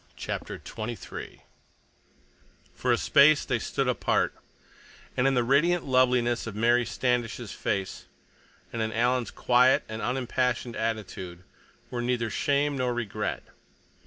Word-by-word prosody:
CHAPTER - - -5
XXIII 115 +1 -7 1.3
For - - -1
a - - +4
Space 145 +2 +5
they - - 0
stood - - -1
apart, - - +1 0.8
and 125 - +2
in 135 - +2
the 125 - +3
radiant 160 +8 +3
loveliness 125 -3 +2
of 110 - -6
Mary 120 +2 +3
Standish's 120 -3 -1
face 95 -1 -3 0.7
and 115 - -2
in 110 0 -1
Alan's 120 +1 +1
quiet 125 +1 +3
and 110 +1 -6
unimpassioned 125 -1 -1
attitude 100 -5 -4 0.5
were 120 - -2
neither 120 -2 -1
shame 145 +3 +1
nor 125 -1 0
regret. 115 -4 -3
120 Hz, 125 wpm, -27 LUFS, 115-130 Hz, 1.3 s, Space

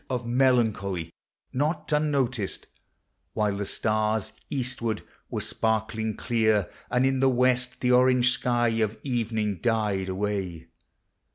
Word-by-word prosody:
Of 125 -2 -2
melancholy, 110 -9 +1 0.4
not 150 +6 -1
unnoticed; 135 -8 0 0.7
while 105 -2 0
the 100 -1 -3
stars, 110 0 0 0.2
Eastward, 125 -4 -2 0.3
were - - -3
sparkling 110 -1 -1
clear, 110 -5 +1 0.2
and 125 +1 +2
in 135 0 +1
the 135 - +4
w 125 0 +3
r - - +5
est 125 +1 -5
The 125 - +2
orange 125 0 +5
sky 120 -2 +1
of 110 0 0
evening 110 -6 -1
died 105 -5 0
away. 95 -4 -3
115 Hz, 125 wpm, -26 LUFS, 105-125 Hz, 0.7 s, r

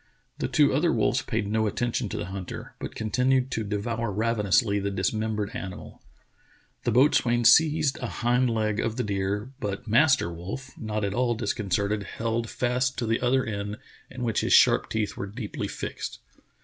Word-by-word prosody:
The - - 0
two 145 -3 +3
other 160 +5 +2
wolves 120 +3 +1
paid 110 -7 -2
no 110 +1 +1
attention 120 +1 -1
to - - -4
the - - -3
hunter, 95 -2 -7
but - - -6
continued 125 +4 +1
to 110 - -1
devour 110 +2 -2
ravenously 105 0 +2
the 100 0 -1
dismembered 105 +2 -1
animal. 95 -2 -7 0.8
The 120 - +2
boatswain 120 -1 +3
seized 155 +3 +5
a 125 - -3
hind 125 +2 +1
leg 110 -2 0
of 115 - -1
the 125 - -1
deer, 100 +3 -2
but 100 +2 -4
Master 115 - +3
Wolf, 100 +11 -7
not 110 -2 -3
at 100 - -2
all 120 +1 +1
disconcerted, 105 -2 -1
held 115 +2 -3
fast 125 +1 0
to 120 - -1
the 115 +1 0
other 130 +1 +2
end 105 -1 -4 0.3
in 130 -1 -6
which 115 -3 0
his - - +1
sharp - - +5
teeth 110 -2 -2
were 100 - -5
deeply 105 +1 -5
fixed. - - -5
110 Hz, 175 wpm, -26 LUFS, 105-125 Hz, 0.8 s, seized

